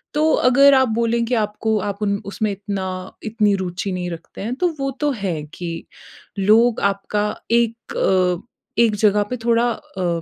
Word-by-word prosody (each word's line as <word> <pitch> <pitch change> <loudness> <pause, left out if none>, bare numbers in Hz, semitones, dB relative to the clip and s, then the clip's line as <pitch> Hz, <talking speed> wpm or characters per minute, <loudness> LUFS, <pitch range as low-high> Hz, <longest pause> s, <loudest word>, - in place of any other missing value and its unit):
तो 310 +1 +3 0.2
अगर 275 +2 +6
आप 260 -1 +5
बोलें 230 +1 +1
कि 240 - -3
आपको 215 +1 -1
आप 200 +1 -5
उन 200 -1 +1
उसमें 205 +2 -2
इतना 200 -1 -4 0.4
इतनी 215 -2 +1
रूचि 185 +1 -3
नहीं 180 -1 -3
रखते 165 -1 -9
हैं 230 +5 -3
तो 360 - +4
वो 275 0 -1
तो 295 -1 +2
है 175 -7 -3
कि, 170 -2 -5 0.5
लोग 220 +4 +4
आपका 200 +1 0 0.3
एक 230 0 0
अ, 180 -2 +2 0.4
एक 220 -2 +2
जगह 210 0 +3
पे 250 - -1
थोड़ा 235 0 +3
अ, 175 -5 -3
210 Hz, 170 wpm, -21 LUFS, 190-235 Hz, 0.5 s, अगर